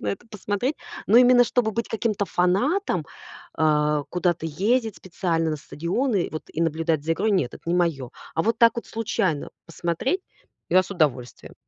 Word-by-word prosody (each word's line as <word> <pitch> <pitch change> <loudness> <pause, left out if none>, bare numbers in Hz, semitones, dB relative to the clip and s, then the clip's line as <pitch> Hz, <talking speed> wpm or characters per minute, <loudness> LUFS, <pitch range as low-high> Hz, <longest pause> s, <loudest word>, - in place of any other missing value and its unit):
на - - -6
это 200 +5 -4
посмотреть. 210 +6 -2 0.3
Но 225 - +6
именно 245 0 +7
чтобы 235 -1 +1
быть 230 +1 -3
каким-то 215 -3 -1
фанатом, 185 - +1 0.5
а, 150 -1 +2
куда-то 175 -2 0
ездить 220 - 0
специально 165 -3 -1
на 155 - -2
стадионы, 180 - -1
вот, 155 - -6
и 160 - -3
наблюдать 160 -1 0
за 165 +1 0
игрой- 215 +6 0
нет, 155 -11 0
это - - -13
не 170 - +1
моё. 155 -8 0 0.3
А 165 - +2
вот 230 +1 +1
так 230 -1 +6
вот 235 - -5
случайно 195 -9 -1 0.2
посмотреть- 170 - -2 0.5
я 185 +1 +5
с - - -13
удовольствием. 135 -8 -2
180 Hz, 170 wpm, -24 LUFS, 160-225 Hz, 0.5 s, именно